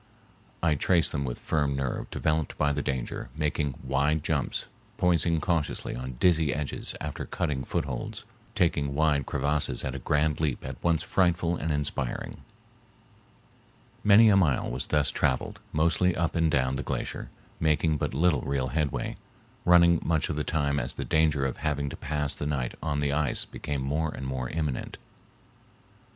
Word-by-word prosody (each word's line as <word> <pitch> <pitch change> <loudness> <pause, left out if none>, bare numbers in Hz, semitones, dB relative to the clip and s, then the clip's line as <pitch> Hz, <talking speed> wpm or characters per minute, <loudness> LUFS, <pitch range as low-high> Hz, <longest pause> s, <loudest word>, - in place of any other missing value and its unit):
I 80 -2 +4
traced 85 +3 +2
them 70 -3 -2
with - - -4
firm 75 -3 0
nerve 70 -2 -3
developed 80 -1 -1
by 75 -1 +2
the 75 - -1
danger, 65 -3 -3
making 75 -3 -1
wide 70 +3 +1
jumps, 80 -4 -1 0.3
poising 85 -2 +2
cautiously 80 -2 -1
on 65 +1 -5
dizzy 80 -5 +3
edges 75 -1 -3
after 75 -1 -4
cutting 65 -3 -2
footholds, - - -3 0.3
taking 75 -5 +1
wide 75 -3 +2
crevasses 70 -4 0
at 65 - -3
a 70 - -5
grand 75 +3 +1
leap 75 -5 -1
at 65 -1 -7
once 85 -2 +2
frightful 85 -2 +1
and 80 - -3
inspiring. 75 -4 -2 1.6
Many 105 +2 +7
a 100 - +5
mile 80 -12 +2
was 60 +1 -3
thus 75 -2 +2
traveled, 65 - 0
mostly 85 +3 +2
up 85 0 -1
and 80 -1 +3
down 65 -2 +1
the - - -2
glacier, - - -4 0.3
making 80 0 +2
but - - -2
little 80 -3 +3
real 70 -2 -1
headway, 75 +1 -2 0.5
running 85 -1 +6
much 80 -3 +1
of - - -1
the 75 - -1
time 70 -3 0
as - - -1
the - - -4
danger 75 -3 +2
of 65 - -2
having 70 -2 -1
to - - -7
pass 75 -1 -1
the 75 - -3
night 65 -5 -2
on 75 -2 -1
the 70 -1 +1
ice 75 -3 +4
became 70 -2 -4
more 75 +4 0
and 65 - -7
more 65 -2 -3
imminent. 75 -5 -3
75 Hz, 165 wpm, -28 LUFS, 70-80 Hz, 1.6 s, Many